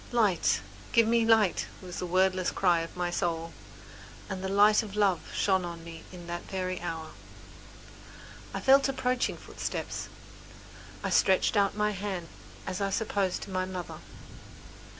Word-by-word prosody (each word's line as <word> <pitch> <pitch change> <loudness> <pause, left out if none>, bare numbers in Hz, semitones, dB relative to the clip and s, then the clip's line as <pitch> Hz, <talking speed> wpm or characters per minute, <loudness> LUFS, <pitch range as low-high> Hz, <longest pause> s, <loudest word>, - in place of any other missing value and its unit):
"Light! 210 -8 +2 0.3
give 230 - +6
me 230 0 +3
light!" 220 -5 +4
was 180 -2 -7
the 180 - -3
wordless 185 0 +2
cry 175 -3 +3
of 165 +2 -6
my 175 -1 -1
soul, 165 -2 -2 0.8
and 190 0 -4
the 190 - -2
light 205 +3 +5
of 210 -3 -8
love 200 -5 +3
shone 190 -2 +2
on 170 -1 -6
me 165 -1 -9
in 175 -2 -10
that 175 0 -4
very 185 -1 -3
hour. 160 -2 -5 1.4
I - - -3
felt 275 +1 +5
approaching 255 -2 0
footsteps, - - -5 0.9
I - - -1
stretched 190 +3 +3
out 200 -1 +3
my 210 0 +2
hand 190 -4 -4 0.4
as 185 +1 -3
I 200 - +1
supposed 195 -2 -1
to 200 - -9
my 185 0 0
mother. 185 -2 -6
190 Hz, 150 wpm, -29 LUFS, 175-210 Hz, 1.4 s, give